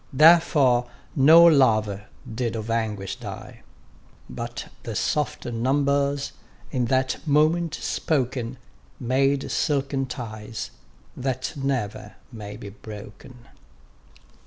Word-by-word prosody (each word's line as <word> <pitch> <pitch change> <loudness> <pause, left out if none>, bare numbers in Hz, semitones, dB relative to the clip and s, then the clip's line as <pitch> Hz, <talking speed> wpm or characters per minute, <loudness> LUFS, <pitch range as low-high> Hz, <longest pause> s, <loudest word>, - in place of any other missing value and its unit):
Therefore 140 -5 +5 0.3
no 160 +4 +8
lover 110 -10 +4 0.2
did 115 0 -3
of 110 0 -4
anguish 105 -4 -2
die: - - -9 0.7
But - - -6
the - - -6
soft 150 -1 -1
numbers, 140 +4 0 0.4
in 125 -2 0
that 130 +2 0
moment 155 +3 +2
spoken, 130 -4 -2 0.4
Made 135 +3 +1
silken 140 -2 0
ties, 115 -3 -6 0.4
that 130 +3 -3
never 125 -7 -3 0.2
may 105 -3 -8
be 105 -3 -8
broken. 105 +4 -11
130 Hz, 95 wpm, -24 LUFS, 110-140 Hz, 0.7 s, no